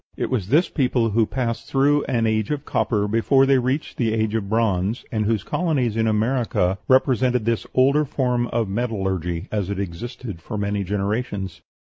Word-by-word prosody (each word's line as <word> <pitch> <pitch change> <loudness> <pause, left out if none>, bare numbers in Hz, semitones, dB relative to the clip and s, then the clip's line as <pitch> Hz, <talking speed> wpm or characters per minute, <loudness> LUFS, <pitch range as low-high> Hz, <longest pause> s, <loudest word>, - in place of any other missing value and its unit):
It - - -2
was 110 -8 -1
this 155 - +3
people 125 -5 +1
who 110 +1 +2
passed 115 -3 -3
through 145 +2 +2
an 120 -3 0
age 110 -1 0
of 150 -1 -3
copper 105 -3 0
before 115 +6 +3
they 135 -1 +4
reached 130 +4 -2
the 115 -3 +1
age 110 -1 0
of 105 -3 -2
bronze, 110 -1 0
and 110 -3 0
whose 110 -3 0
colonies 135 -8 0
in 110 0 +1
America 110 -4 +1
represented 125 -2 +3
this 115 -1 -1
older 140 +4 +4
form 125 -4 0
of 115 -3 -1
metallurgy 95 -5 -2
as 100 -3 -2
it 100 -1 -3
existed 100 +1 -6
for 105 +5 -6
many 100 0 -1
generations. 100 -2 -3
115 Hz, 175 wpm, -22 LUFS, 100-130 Hz, -, they